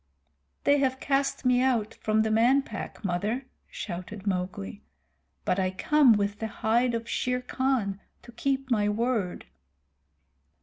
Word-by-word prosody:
"They 285 0 +4
have 260 -1 +1
cast 275 -1 0
me 250 0 +4
out 240 -5 +1
from 215 0 +1
the 220 - 0
Man 245 +5 +4
Pack, 210 -1 -7
Mother," 210 +8 -1 0.2
shouted 190 +2 -6
Mowgli, 180 - -3 0.6
"but 185 - +1
I 185 -1 +1
come 270 +7 +4
with 205 0 -1
the 220 - -2
hide 235 +3 +1
of 230 0 -4
Shere 250 +1 -1
Khan 250 -7 -1 0.2
to 240 - -12
keep 270 +2 -2
my 210 -3 +3
word." 220 -4 -1
225 Hz, 140 wpm, -27 LUFS, 200-255 Hz, 0.6 s, They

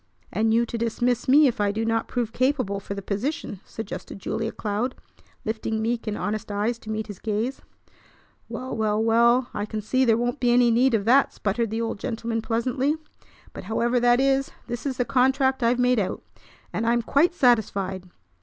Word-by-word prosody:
"And 220 +3 +2
you 230 +1 +3
to 235 0 -5
dismiss 240 +1 0
me 290 +4 +7
if 245 -4 +1
I 205 -1 +2
do 220 +2 -2
not 225 0 0
prove 240 -2 -2
capable 255 -7 0
for 200 0 -6
the 200 - -6
position," 210 - -3
suggested 225 -2 -7
Julia 225 +3 -3
Cloud, 215 +4 -2 0.5
lifting 220 0 -2
meek 230 +1 -2
and 210 - -2
honest 215 0 -3
eyes 215 +4 -1
to 220 - -11
meet 220 0 -2
his 205 -3 -9
gaze. 225 +5 -2 0.9
"Well, 260 +1 -5
well, 215 -1 +1
well, 235 +2 +3
I 205 +1 -3
can 215 - -4
see 255 +5 +1
there 225 -3 +4
won't 245 +4 -1
be 245 - +2
any 240 0 +5
need 240 +1 +3
of 200 -2 -1
that!" 265 +4 +4
sputtered 225 +3 -1
the 225 +2 -2
old 225 -2 -3
gentleman 225 +1 -3
pleasantly. 255 +6 0 0.6
"But, - - -8
however 235 +4 +1
that 240 0 +4
is, 270 0 +2 0.2
this 240 +3 -4
is 260 -2 -3
the 245 - +1
contract 265 +1 +2
I've 235 +1 +3
made 250 -1 +3
out. 190 - -2 0.5
And 230 - -1
I'm 235 0 +2
quite 335 +9 +2
satisfied. 195 - +1
230 Hz, 190 wpm, -25 LUFS, 215-250 Hz, 0.9 s, me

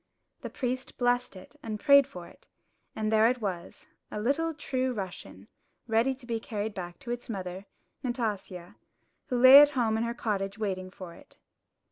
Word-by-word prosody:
The - - -6
priest 255 0 -4
blessed 245 -2 0
it 185 +9 -13
and 215 -4 -5
prayed 280 0 +6
for 180 -9 -10
it; - - -20 0.5
and 215 0 -1
there 220 0 +5
it 250 0 -1
was, 185 -5 -5 0.2
a 210 - -5
little 285 +9 0
true 260 -4 -2
Russian, 195 -4 -8 0.4
ready 235 +3 +1
to 255 -1 -16
be 230 -2 -2
carried 215 -1 -4
back 175 -2 -7
to 240 - -6
its 240 +1 -5
mother, 190 -2 -6 0.3
Nastasia, 205 -6 -4 0.5
who 250 - -1
lay 260 +3 +10
at 290 - +6
home 220 -3 +2
in - - 0
her 235 0 -3
cottage 200 -3 -2
waiting 190 -4 -3
for 185 -2 -10
it. - - -18
225 Hz, 175 wpm, -28 LUFS, 195-250 Hz, 0.5 s, lay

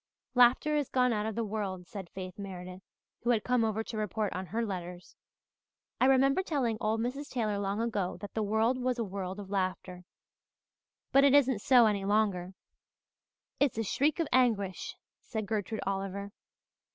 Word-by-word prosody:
"Laughter 250 +5 +5
is 290 -3 0
gone 250 -2 +2
out 210 0 -1
of 220 - -4
the 230 - -1
world," 200 -4 -4
said 190 -4 -8
Faith 185 0 -8
Meredith, 185 -2 -7 0.4
who 240 - -2
had 225 -3 +3
come 250 -2 +2
over 220 0 0
to 220 - -6
report 215 0 -1
on 185 0 -4
her 230 +5 -1
letters. 180 -3 -6 0.8
"I 255 - +5
remember 270 +5 +4
telling 270 - -1
old 220 0 0
Mrs. 270 +5 -3
Taylor 215 -5 -1
long 200 +1 -1
ago 210 -7 -1
that 200 +2 -9
the 220 - -1
world 220 +4 +1
was 250 0 0
a 235 - 0
world 190 -1 -5
of 200 -1 -8
laughter. 185 -2 -2 1.1
But 275 - +6
it 280 0 +6
isn't 260 -6 +4
so 250 -2 +6
any 205 -2 +1
longer." 195 -3 0 1.0
"It's 280 -6 +2
a 225 - 0
shriek 285 - +1
of 330 - +1
anguish," 220 -7 +1 0.2
said 220 -2 -4
Gertrude 215 +1 -2
Oliver. 195 +1 -3
215 Hz, 175 wpm, -30 LUFS, 195-245 Hz, 1.1 s, But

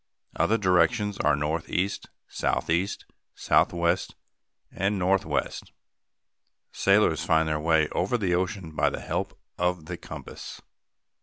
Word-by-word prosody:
Other 100 +8 +2
directions 105 +2 +2
are 75 -1 +3
northeast, 80 +6 -2 0.2
southeast, 85 +5 -1 0.3
southwest, 85 +1 +1 0.6
and 100 +2 -1
northwest. 95 -5 -1 1.0
Sailors 100 -5 +3
find 80 -1 +2
their 75 -1 0
way 80 -1 +3
over 100 +7 0
the 95 -6 0
ocean 90 -1 -2
by - - +3
the - - -5
help - - -3 0.2
of 90 -2 0
the 85 +1 -6
compass. - - -9
90 Hz, 110 wpm, -26 LUFS, 80-100 Hz, 1.0 s, are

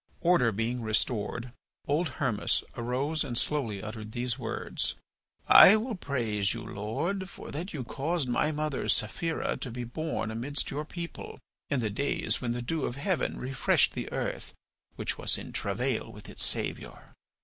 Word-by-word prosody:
Order 170 -10 +4
being 115 +4 -1
restored, 115 +1 -1 0.3
old 155 +3 +2
Hermas 125 -7 +2
arose 130 +6 0
and 125 -5 -3
slowly 115 -9 +1
uttered 110 0 -6
these 125 +1 -2
words: 115 -3 -2 0.5
"I 200 - +11
will 225 +3 -1
praise 115 - 0
you, 115 - -5
Lord, 160 - -2
for - - -9
that 170 +7 -4
you 140 -5 -4
caused 145 +4 -1
my 125 +5 +2
mother, 150 -2 -2
Saphira, 160 +10 +1
to 135 - -4
be 125 +1 -4
born 120 -3 -3
amidst 125 +6 -1
your 150 +2 -3
people, 170 +2 -7 0.3
in 140 -3 +1
the 110 -2 -1
days 140 +7 0
when 120 -2 0
the 120 0 -3
dew 155 +4 -1
of 120 - -3
heaven 165 +5 0
refreshed 130 +1 +2
the - - -4
earth - - -3 0.4
which - - -2
was - - +1
in - - -7
travail - - -1
with - - -11
its - - -1
Saviour. - - -2
125 Hz, 160 wpm, -30 LUFS, 115-155 Hz, 0.5 s, I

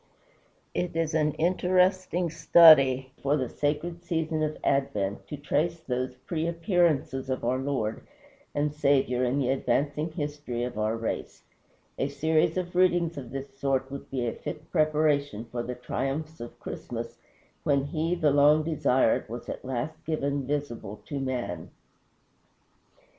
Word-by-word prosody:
It 175 -2 -2
is 165 -1 0
an 150 -1 +2
interesting 180 0 +2
study 150 -5 +7
for 140 +2 +2
the 130 -3 -1
sacred 155 +6 -2
season 160 -2 -1
of 155 0 -1
Advent 105 -8 0
to 150 - -6
trace 150 +4 0
those 125 -3 -3
pre 165 +1 -1
appearances 165 -7 +1
of 130 -2 -2
our 125 +2 +1
Lord 130 -6 -2 0.5
and 145 0 0
Saviour 135 -4 +2
in 125 +2 +1
the 130 -3 +1
advancing 145 +4 0
history 145 -6 -4
of 125 - -4
our 110 +1 0
race. 115 0 -4 0.6
A 135 - +1
series 155 +4 +1
of 180 -1 -3
readings 175 -2 +3
of 135 -4 -7
this 135 +1 -7
sort 135 -1 0
would 140 - -7
be 130 -3 -2
a 115 - -1
fit 155 0 -8
preparation 150 - +1
for 120 +1 -4
the 125 +1 -5
triumphs 135 +5 -3
of 120 - -9
Christmas, - - -6 0.4
when 140 -2 +2
he, 160 +4 -1
the 155 -4 +2
long 145 +2 +5
desired, 130 -8 +2
was 120 +1 -7
at - - -5
last 130 +4 -4
given 140 -4 -1
visible 120 -8 -3
to 145 - -4
man. 125 -11 -3
145 Hz, 150 wpm, -27 LUFS, 130-160 Hz, 0.6 s, study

